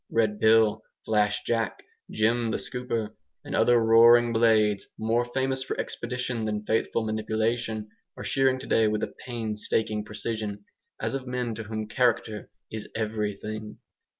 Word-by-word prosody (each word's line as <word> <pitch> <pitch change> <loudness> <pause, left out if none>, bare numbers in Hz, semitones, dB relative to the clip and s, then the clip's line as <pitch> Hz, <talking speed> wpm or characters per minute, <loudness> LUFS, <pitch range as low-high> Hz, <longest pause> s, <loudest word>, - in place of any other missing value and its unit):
Red 110 -2 +1
Bill, 110 -1 +4 0.2
Flash 105 -1 +1
Jack, 115 -1 -1 0.3
Jem 115 +2 +1
the - - 0
Scooper, 115 -4 -3 0.3
and - - -4
other 120 0 +5
roaring 115 +1 +6
blades, 110 -3 +3
more 115 +2 +1
famous 130 +2 -1
for 130 - -4
expedition 125 -2 -3
than 105 -1 -2
faithful 110 +1 0
manipulation, 110 0 -1 0.3
are - - -6
shearing 135 -1 +2
today 115 -4 +2
with 105 0 -1
a - - -3
painstaking 110 -2 -2
precision, 105 -1 -5 0.3
as - - -2
of 135 -1 -4
men 125 -2 -2
to 110 0 -6
whom 110 0 -4
character 110 -3 0 0.2
is 110 -1 -6
everything. 105 -1 -3
110 Hz, 140 wpm, -27 LUFS, 110-120 Hz, 0.3 s, roaring